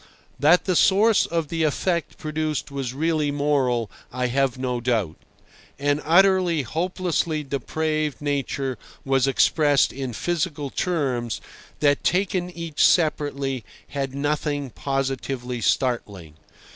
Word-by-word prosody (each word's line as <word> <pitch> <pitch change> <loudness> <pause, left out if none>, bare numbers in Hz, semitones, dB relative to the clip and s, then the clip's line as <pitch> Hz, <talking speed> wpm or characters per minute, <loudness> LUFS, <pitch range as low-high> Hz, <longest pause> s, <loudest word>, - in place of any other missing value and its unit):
That 155 +6 +5
the 185 - +1
source 210 +5 +4
of 165 -3 -2
the 165 -1 -2
effect 170 +2 0
produced 155 -1 -3
was 135 -3 -3
really 155 +1 0
moral 140 -6 0 0.2
I 125 0 -1
have 135 -2 +1
no 125 -2 -2
doubt. 110 -9 0 0.6
An 145 +1 0
utterly, 180 -2 +4
hopelessly 165 - -1
depraved 155 +2 -2
nature 140 -3 -2 0.3
was 135 -1 +2
expressed 145 +1 +3
in 130 -2 -4
physical 150 -1 -2
terms, 130 -10 -1 0.4
that 145 -1 +3
taken 180 -1 +1
each 165 -3 -2
separately 140 -6 +1 0.3
had 135 -2 -3
nothing 145 -1 -1
positively 135 -2 -3
startling. 105 - -1
145 Hz, 115 wpm, -24 LUFS, 130-160 Hz, 0.6 s, That